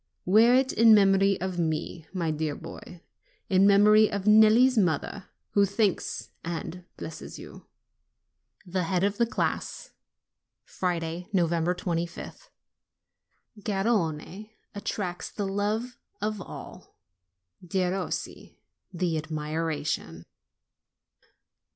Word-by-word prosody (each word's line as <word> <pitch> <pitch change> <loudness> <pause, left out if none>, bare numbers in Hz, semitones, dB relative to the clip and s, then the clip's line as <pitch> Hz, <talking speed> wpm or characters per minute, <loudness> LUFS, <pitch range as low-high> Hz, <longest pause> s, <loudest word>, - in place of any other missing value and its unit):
wear 225 +6 +6
it 265 +1 +2
in 225 -1 +7
memory 195 -1 +4
of 185 -1 -3
me, 160 0 -2
my 170 -4 -1
dear 155 -1 -2
boy; 165 +1 -11 0.5
in 190 +1 +5
memory 210 +2 +6
of 200 -1 -2
Nelli's 220 +4 +6
mother, 185 0 0 0.3
who 200 - +4
thanks 200 0 -1
and 170 +1 -5
blesses - - -8
you." - - -12 1.0
THE 180 -1 -2
HEAD 180 +1 0
OF 200 0 0
THE 235 - +2
CLASS - - -3 0.7
Friday, 175 -1 -3
25th. 170 - -2 1.1
Garrone 195 -2 -1 0.2
attracts 185 -3 -4
the 205 - -4
love 215 +5 -2 0.2
of 210 -1 -2
all; - - -11 0.7
Derossi, 185 +1 -3 0.3
the 170 -3 -1
admira 155 -1 -3
tion. 80 - -3
185 Hz, 100 wpm, -27 LUFS, 165-210 Hz, 1.1 s, in